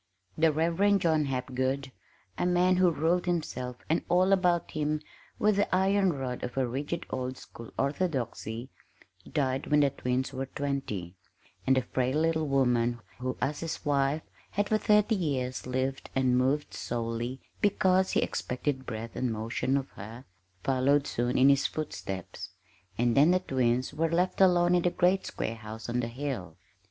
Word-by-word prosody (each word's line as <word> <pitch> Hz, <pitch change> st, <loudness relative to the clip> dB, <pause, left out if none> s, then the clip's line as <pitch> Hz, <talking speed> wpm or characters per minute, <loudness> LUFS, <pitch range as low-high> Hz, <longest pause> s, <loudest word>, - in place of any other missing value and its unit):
The 160 Hz, 0 st, +4 dB
Reverend 170 Hz, +6 st, +2 dB
John 160 Hz, -3 st, +2 dB
Hapgood 130 Hz, +1 st, -2 dB, 0.4 s
a 175 Hz, -, 0 dB
man 180 Hz, +1 st, +3 dB
who 185 Hz, -1 st, +5 dB
ruled 170 Hz, +3 st, +1 dB
himself 130 Hz, -8 st, -2 dB
and 160 Hz, -, +1 dB
all 185 Hz, +2 st, +4 dB
about 180 Hz, -3 st, +2 dB
him 155 Hz, 0 st, -1 dB, 0.4 s
with 210 Hz, -1 st, +2 dB
the 200 Hz, -2 st, +2 dB
iron 195 Hz, 0 st, +3 dB
rod 130 Hz, -3 st, -4 dB
of 125 Hz, +1 st, -5 dB
a 130 Hz, -, +2 dB
rigid 145 Hz, +7 st, -3 dB
old 130 Hz, 0 st, -3 dB
school 115 Hz, -1 st, -11 dB
orthodoxy 130 Hz, -6 st, -2 dB, 0.6 s
died 135 Hz, -2 st, 0 dB
when 150 Hz, 0 st, +4 dB
the 140 Hz, -1 st, +3 dB
twins 130 Hz, 0 st, -2 dB
were 135 Hz, 0 st, -3 dB
twenty; 135 Hz, -12 st, -3 dB, 0.5 s
and 130 Hz, -, +5 dB
the 130 Hz, -, +2 dB
frail 130 Hz, +3 st, 0 dB
little 160 Hz, -1 st, +1 dB
woman 120 Hz, -3 st, +2 dB, 0.2 s
who, 130 Hz, 0 st, -3 dB
as 145 Hz, +1 st, -1 dB
his 165 Hz, -1 st, -5 dB
wife, 145 Hz, +1 st, +1 dB, 0.3 s
had 205 Hz, 0 st, -1 dB
for 215 Hz, -, +3 dB
thirty 210 Hz, +1 st, +4 dB
years 130 Hz, -9 st, -2 dB
lived 130 Hz, +1 st, -2 dB
and 130 Hz, -1 st, +3 dB
moved 135 Hz, +4 st, +1 dB
solely 120 Hz, +2 st, -3 dB, 0.2 s
because 190 Hz, -2 st, +3 dB
he -, -, +3 dB
expected 130 Hz, +1 st, -3 dB
breath 115 Hz, 0 st, -5 dB
and 125 Hz, -2 st, -1 dB
motion 115 Hz, +5 st, -1 dB
of 135 Hz, -1 st, -3 dB
her, 115 Hz, +6 st, -10 dB, 0.4 s
followed 135 Hz, +2 st, +2 dB
soon 120 Hz, +1 st, -1 dB
in 130 Hz, -, +6 dB
his 140 Hz, -1 st, +4 dB
footsteps. 95 Hz, -, -5 dB, 0.5 s
And 120 Hz, 0 st, +2 dB
then 145 Hz, +4 st, +6 dB
the 180 Hz, +1 st, +4 dB
twins 130 Hz, -6 st, 0 dB
were 165 Hz, +1 st, 0 dB
left 180 Hz, +3 st, +1 dB
alone 175 Hz, -2 st, +5 dB
in 175 Hz, -, +4 dB
the 175 Hz, -, +2 dB
great 185 Hz, +2 st, +2 dB
square 115 Hz, -, -3 dB
house 110 Hz, 0 st, -8 dB
on 120 Hz, +1 st, -1 dB
the 120 Hz, -, -1 dB
hill. 120 Hz, -, -5 dB
140 Hz, 165 wpm, -29 LUFS, 125-170 Hz, 0.6 s, in